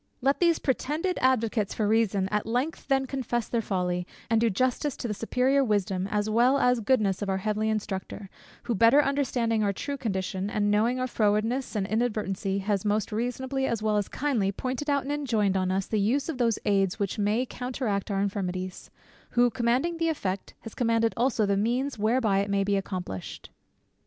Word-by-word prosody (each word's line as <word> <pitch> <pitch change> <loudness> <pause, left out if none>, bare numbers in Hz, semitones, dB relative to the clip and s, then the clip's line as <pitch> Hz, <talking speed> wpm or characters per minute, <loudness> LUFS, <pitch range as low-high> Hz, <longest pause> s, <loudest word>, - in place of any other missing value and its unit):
Let 275 +3 +1
these 340 -2 +4
pretended 300 +7 -1
advocates 230 -5 +1
for 215 - 0
reason 205 -3 +2
at 210 +1 -1
length 250 +8 -2
then 270 -1 +2
confess 245 -3 -2
their 235 - 0
folly, 180 -3 -2 0.2
and 225 -1 +4
do 230 - +3
justice 255 +7 0
to - - -4
the 210 - -2
superior 255 +6 +1
wisdom 195 -5 0
as 205 +1 -1
well 240 +5 +4
as 250 -3 +3
goodness 215 -5 +1
of 205 - -2
our 190 - +1
heavenly 215 +2 -1
Instructor, 205 -1 -4 0.4
who 240 - -1
better 230 +8 +5
understanding 245 -6 0
our 200 - +2
true 280 +8 -4
condition, 190 -5 -2
and 205 -1 +1
knowing 230 +5 +2
our 255 - 0
frowardness 225 +2 0
and 200 -2 0
inadvertency, 210 -3 -1
has 200 -1 -1
most 210 +1 0
reasonably 260 +4 -2
as 225 -2 -2
well 215 -1 +1
as 205 - 0
kindly 250 -9 0
pointed 260 +7 -4
out 280 -2 +2
and 275 - -4
enjoined 225 -9 0
on 185 -1 +1
us 190 +1 0
the 215 - -1
use 270 +9 +1
of 285 -5 -4
those 230 -3 +2
aids 195 -2 +2
which 200 0 -2
may 210 +5 +1
counteract 245 -6 -3
our 195 -1 0
infirmities; 185 -2 -3 0.4
who 245 0 +4
commanding 250 +9 0
the 330 0 +1
effect, 200 -11 -3
has 225 - -9
commanded 230 -1 +1
also 235 -3 +1
the 200 0 +1
means 240 +5 -1
whereby 215 -2 +2
it 200 +1 -1
may 200 0 +2
be 200 0 +1
accomplished. 185 - -5
220 Hz, 190 wpm, -27 LUFS, 200-255 Hz, 0.4 s, better